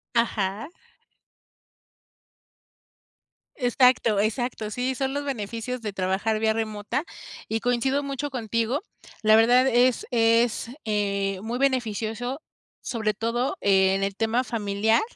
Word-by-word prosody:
Ajá. 220 - 0 2.8
Exacto, 245 -4 +3
exacto. 220 0 -1
Sí, 255 +3 -1
son 270 +1 -2
los 285 0 -3
beneficios 235 0 -4
de 210 -3 -4
trabajar 195 +4 0
vía 220 0 +2
remota 220 +5 -2 0.4
y 225 0 -1
coincido 245 +4 +1
mucho 280 +1 -3
contigo. 230 - -1 0.4
La 215 0 +6
verdad 245 +4 +5
es 245 0 +3
es, 230 0 +2 0.2
eh, 200 -2 -1
muy 235 +3 -4
beneficioso, 245 0 -1 0.4
sobre 220 -3 -1
todo 230 +4 -1
en 195 0 +3
el 195 0 -2
tema 225 +4 +1
familiar, 220 -1 +1
230 Hz, 110 wpm, -25 LUFS, 210-250 Hz, 2.8 s, La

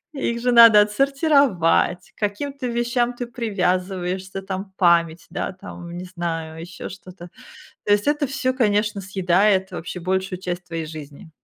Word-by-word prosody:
их 235 -4 -2
же 245 +1 +1
надо 230 -3 +9
отсортировать, 235 - +2
к - - -31
каким-то 255 +6 -3
вещам 240 +1 0
ты 245 0 -6
привязываешься, 190 -4 -2
там, 190 0 -6
память, 170 -2 +2
да, - - -3
там, 175 -2 -10
не 180 - -6
знаю, 165 -3 -5
ещё 175 +1 -8
что-то. 185 -1 -11 0.6
То 205 - +2
есть 205 +5 +2
это 295 0 +1
всё, 270 -1 -1
конечно, 210 -3 +1
съедает 190 +1 +2
вообще 180 0 -6
большую 190 +1 -2
часть 180 -1 -4
твоей 165 -2 -4
жизни. 150 -1 -10
190 Hz, 145 wpm, -22 LUFS, 175-235 Hz, 0.6 s, надо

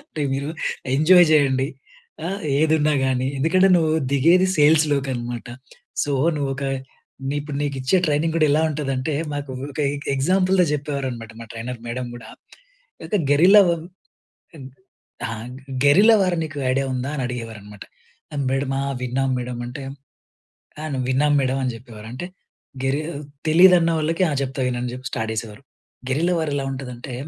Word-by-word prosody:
అంటే, 160 - -8
"మీరు 140 +2 -2 0.5
ఎంజాయ్ 175 +5 +6
చేయండి. 135 -3 +3 0.6
ఆహ్, 195 +2 -3 0.2
ఏదున్నా 155 -1 +3
గానీ. 130 0 0
ఎందుకంటే 185 +7 +4
నువ్వు 160 -2 +2 0.2
దిగేది 170 +7 +4
సేల్స్‌లోకనమాట. 140 -6 +1 0.5
సో 145 - -1 0.2
నువ్వొక 140 -1 -2 0.6
నే 140 - -1
ఇప్పుడు 145 -1 -6
నీకిచ్చే 135 +3 0
ట్రైనింగ్ 155 +2 +1
కూడా 155 -2 +4
ఎలా 155 +2 +3
ఉంటదంటే" 140 0 -2 0.2
మాకు 145 -1 -5 0.2
ఒక 140 - -11
ఎ - - -3 0.2
ఎగ్జాంపుల్‌గా 185 +5 +3
చెప్పేవారనమాట 135 -6 -3
మా - - -10
ట్రైనర్ 115 +1 -6
మేడం 125 +1 -4
గూడా. 115 -2 -10 0.7
అయితే 210 - 0
"గెరిల్లా 185 +8 +7
వం 170 -2 0 0.8
ఇం 140 - -10 0.6
ఆ! - - -5 0.6
గెరిల్లా 200 +11 +7
వార్ 180 -2 0
నీకు 155 -2 -7
ఐడియా 135 +1 +1
ఉందా?" 130 +2 -3
అని 135 - -2
అడిగేవారనమాట. 110 -4 -8 0.7
మేడమా! 135 0 -1 0.2
విన్నాం 130 +2 0
మేడం". 125 0 -5
అంటే 125 +3 -7 1.0
"ఆ! - - -6
నేను 130 - -2
విన్నాం 145 +3 +2
మేడం" 130 0 0
అని 125 - -1
చెప్పేవారు. 115 -3 -12
అంటే 135 +8 -5 0.6
గెరి 135 +2 +1 0.5
తెలీదన్న 175 +1 +6
వాళ్ళకి, 165 +4 0
"ఆ! - - -2
చెప్తా 135 0 -4
విను" 125 -1 -1
అని 125 - -3
చెప్పి 130 +1 -8
స్టార్ట్ 110 0 -3
చేసేవారు. 110 +2 -6 0.5
గెరిల్లా 165 +7 +1
వార్ 160 -2 -1
ఎలా 140 - -1
ఉంటదంటే 125 -1 -7
140 Hz, 145 wpm, -22 LUFS, 130-155 Hz, 1.0 s, గెరిల్లా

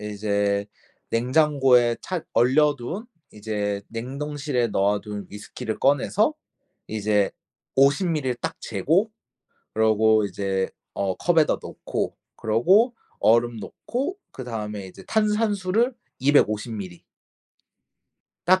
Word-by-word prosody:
이제 100 -1 -1 0.4
냉장고에 125 -1 +3
차 180 -4 -3
얼려둔 145 - +2 0.3
이제 105 -1 -3
냉동실에 135 +1 -2
넣어둔 105 0 -1
위스키를 105 +1 -6
꺼내서 160 - +2 0.5
이제 105 -2 +1 0.5
50 140 +7 +4
밀리를 140 -7 -1
딱 120 - -4
재고 190 +8 +1 0.6
그러고 110 0 +4
이제 95 -1 -2 0.2
어 95 -2 -1
컵에다 165 -3 +3
넣고 - - -4 0.2
그러고 190 - +3 0.2
얼음 115 +2 +3
넣고 270 - -4
그다음에 105 -6 -5
이제 90 - -13
탄산수를 215 +1 +1 0.3
250 120 -5 +2
밀리. 95 -5 -7 1.4
딱 185 +1 +5
120 Hz, 210 characters per minute, -24 LUFS, 105-155 Hz, 1.4 s, 딱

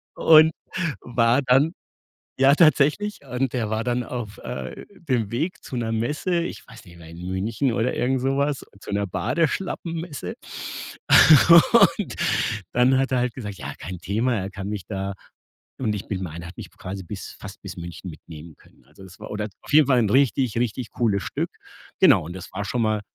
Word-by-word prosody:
und 160 0 +7 0.5
war 120 +2 +2
dann 135 +6 +3 0.7
ja 135 +1 +6
tatsächlich, 155 +6 +3
und 125 0 -2
der 115 -4 -1
war 110 +1 -1
dann 125 0 0
auf, 115 -4 -6
äh, 65 -1 -7
dem 125 - -1
Weg 155 +10 -2
zu 130 - -6
'ner 115 -2 -2
Messe. 150 - -1
Ich 170 - -7
weiß - - -13
nicht 85 -1 -15
mehr, 80 -1 -13
in 85 +2 -9
München 110 +7 -1
oder 115 +2 0
irgend 130 +1 0
so 135 +2 0
was, 140 0 0 0.2
zu - - -9
'ner 100 0 0
Badeschlappen-Messe. 165 - -2 1.6
Und 210 - -5 0.6
dann 125 +2 +4
hat 135 0 0
er 130 - +2
halt 125 -1 -1
gesagt: 105 -6 -6
„Ja, - - -6
kein 90 +2 -7
Thema,“ 110 +8 0
er 95 -1 -3
kann 95 0 -6
mich 105 -3 -4
da 95 -1 -4 0.7
und 110 -5 0
ich 100 - -6
bin 95 -2 -3
meine, 85 -1 -6
er 85 - -8
hat 90 - -12
mich - - -8
quasi 95 +1 -8
bis 85 - -8
fast - - -10
bis - - -8
München 85 +1 -7
mitnehmen 80 +1 -12
können. - - -24
Also, - - -17
es 95 -1 -14
war - - -9
oder 105 0 -3
auf - - -10
jeden 150 -1 +6
Fall 130 -3 +4
'n 110 -4 +2
richtig, 130 -2 +2
richtig 120 0 -2
cooles 105 -5 0
Stück. - - -3 0.5
Genau - - +6
und 85 - -7
das 95 -1 -9
war 100 +2 -4
schon 120 +4 -1
mal 110 -1 +1
115 Hz, 190 wpm, -23 LUFS, 100-135 Hz, 1.6 s, und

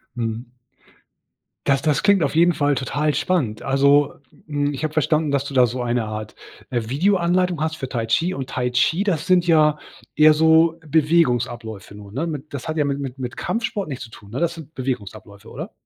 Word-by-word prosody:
Mhm. 115 +1 -4 1.1
Das 135 -1 +3
das 150 -2 +1
klingt 200 -3 +4
auf 145 +1 0
jeden 170 +1 +5
Fall 145 -1 +1
total 145 +4 -1
spannend. 135 -13 -1
Also, 140 +1 +3 0.3
hm, 145 -1 -1
ich 140 - -6
habe 155 0 -2
verstanden, 155 -1 +1
dass 140 0 0
du 140 - -7
da 125 -1 +6
so 125 +2 -4
eine 120 -1 -1
Art, 105 0 -6 0.3
äh, 120 -2 -1
Videoanleitung 180 +2 +1
hast 160 0 -1
für 130 - -5
Tai 115 -3 -2
Chi 165 +12 0
und 135 -1 -6
Tai 125 -2 -1
Chi, 145 +10 +2
das 170 -6 -1
sind 180 -2 +3
ja 155 -2 +4 0.4
eher 155 +1 +7
so 160 +1 +4
Bewegungsabläufe 125 - 0
nur, 100 -1 -12
ne? 145 +10 -2
Mit 150 -2 -6
das 135 -1 -6
hat 155 0 -3
ja 150 - +2
mit 140 0 -2
mit 135 -1 -6
mit 125 -2 -5
Kampfsport 225 -4 -3
nichts 130 -2 -5
zu 115 - -17
tun, 100 -3 -14
ne? 120 - -4
Das 170 0 0
sind 160 -2 -12
Bewegungsabläufe, 110 -5 -6
oder? - - -7
145 Hz, 200 wpm, -21 LUFS, 125-160 Hz, 1.1 s, eher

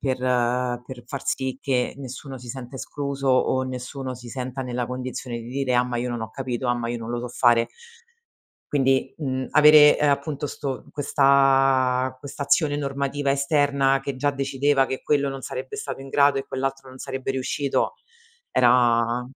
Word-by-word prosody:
per 130 -2 -1
per 125 0 -1
far 140 -3 -6
sì 130 -1 -1
che 125 -3 0
nessuno 135 0 -8
si 125 - -12
senta 130 +1 -7
escluso 140 0 -4
o 130 0 +3
nessuno 130 +1 -5
si 125 0 -11
senta 130 +1 -5
nella 125 -1 -3
condizione 125 -1 -5
di 115 0 -9
dire: 130 0 -1
"Ah, 125 0 +4
ma 125 -1 -3
io 125 +1 -2
non 120 -1 -3
ho 110 0 -5
capito. 125 0 -3
Ah, 120 - +3
ma 120 -1 -3
io 120 0 -3
non 115 0 -6
lo 120 - -2
so 125 - -5
fare". 120 -1 +3 1.1
Quindi, 135 -2 +1
mhmm, 130 -4 -3
avere, 150 0 +8
ehm, 150 -1 +3
appunto, 140 +1 -2
'sto 135 -2 -5
questa 135 -2 +3
questa 140 +1 -6
azione 145 0 +2
normativa 140 0 -2
esterna 140 -1 +2
che 135 0 -4
già 145 +2 +1
decideva 135 0 +1
che 130 0 -4
quello 140 -2 +1
non 135 - -6
sarebbe 130 0 -6
stato - - -5
in 135 - -10
grado 145 0 +4
e 135 - -4
quell'altro 135 0 -4
non 130 - -13
sarebbe 135 +1 -4
riuscito, 135 +1 -1 0.6
era 120 -1 +3
130 Hz, 175 wpm, -24 LUFS, 125-140 Hz, 1.1 s, avere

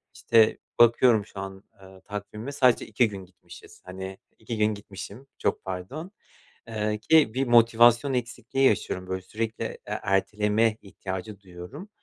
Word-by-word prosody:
İşte, 115 -2 +4 0.2
bakıyorum 115 -2 +5
şu 100 - -11
an, 95 0 -7 0.2
eee, 95 0 -15
takvime 105 +5 -6
sadece 130 -4 +3
2 110 +2 +2
gün 95 -2 -8
gitmişiz. 90 -1 -16
Hani, 95 +1 -7 0.2
2 115 +1 -5
gün 105 0 +2
gitmişim. 100 +5 -10
Çok - - -1
pardon, 95 - -6 0.6
eee, 105 -1 -2
ki 145 0 +4
bir 135 +1 0
motivasyon 120 +2 +5
eksikliği 125 +2 -1
yaşıyorum 95 -2 -2
böyle 95 0 -3
sürekli, 110 +4 -4
eee, - - -6
erteleme 105 +2 +1
ihtiyacı 100 +1 -7
duyuyorum. 95 - -10
105 Hz, 140 wpm, -26 LUFS, 95-120 Hz, 0.6 s, bakıyorum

